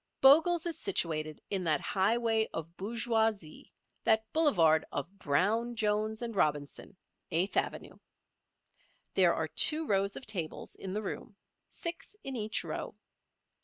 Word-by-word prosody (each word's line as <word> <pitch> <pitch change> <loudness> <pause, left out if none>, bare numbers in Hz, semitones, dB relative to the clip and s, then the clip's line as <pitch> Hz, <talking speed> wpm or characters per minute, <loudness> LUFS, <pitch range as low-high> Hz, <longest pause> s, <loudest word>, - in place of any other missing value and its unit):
Bogle's 320 +5 +6
is 335 -2 -4
situated 155 - -2
in 195 -2 0
that 155 -3 +2
highway 220 +4 +1
of 165 +1 -6
bourgeoisie, 220 -4 -1 0.3
that 220 0 +3
boulevard 170 - +4
of 180 +8 -5
Brown 215 +12 +1
Jones 215 +1 0
and 230 -2 -4
Robinson, 150 +2 -1 0.3
Eighth 180 +4 0
Avenue. - - -2 1.1
There - - +4
are - - -1
two 315 +1 +3
rows 200 -4 +1
of 260 - -7
tables 175 -7 -5
in 190 -1 -7
the 215 +1 -2
room, 210 +2 -6 0.3
six 335 +3 -6
in 270 -1 -5
each 215 -1 -1
row. - - -5
210 Hz, 130 wpm, -31 LUFS, 175-235 Hz, 1.1 s, Bogle's